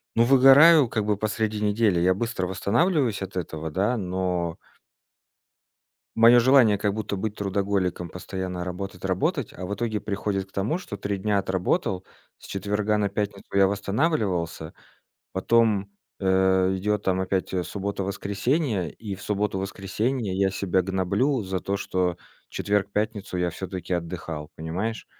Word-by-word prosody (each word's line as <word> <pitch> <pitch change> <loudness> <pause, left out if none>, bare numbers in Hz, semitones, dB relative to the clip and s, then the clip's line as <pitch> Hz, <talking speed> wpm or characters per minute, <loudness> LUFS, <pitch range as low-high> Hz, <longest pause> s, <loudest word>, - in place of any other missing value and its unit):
ну, 115 - +5
выгораю 135 +3 +7
как 110 -4 -1
бы 105 -1 +1
посреди 110 0 -1
недели. 105 -3 +2
Я 90 +2 +4
быстро 100 -4 -2
восстанавливаюсь 115 - +1
от 95 -1 -5
этого, 80 -2 -4
да, 100 +9 +1
но 90 -3 -2 1.6
моё 115 +2 +7
желание- 120 -4 +5
как 105 -1 0
будто 110 -1 -3
быть 105 +2 -3
трудоголиком, 95 -3 -1
постоянно 90 0 -5
работать 90 0 -6
работать, 95 -1 -1
а, 90 - -7
в 100 - -3
итоге 110 0 -2
приходит 100 -1 -2
к - - -25
тому, 105 - -1
что 105 - -7
3 100 0 -2
дня 105 +1 0
отработал, 95 0 -1 0.4
с - - -13
четверга 105 +2 -1
на 100 -1 +1
пятницу 100 -1 -3
я 95 -1 +6
восстанавливался. 100 - -1 0.6
Потом, 105 0 +2 0.3
э, 95 0 +3
идёт 105 +2 -1
там 95 0 +1
опять, 95 0 -1
э, 90 - 0
суббота, 100 +1 -4
воскресение, 100 - -1
и 105 -3 -6
в 95 - -12
субботу, 105 -1 -1
воскресенье 100 +3 -2
я 95 0 +2
себя 95 -1 0
гноблю 95 +8 0
за 95 -1 -2
то, 100 +1 -2
что 90 -2 -1 0.3
четверг, 100 -1 -1
пятницу 105 -2 -2
я 90 -1 0
всё-таки 95 0 -4
отдыхал, 85 -3 -5
понимаешь? 95 +8 -3
100 Hz, 150 wpm, -25 LUFS, 95-105 Hz, 1.6 s, выгораю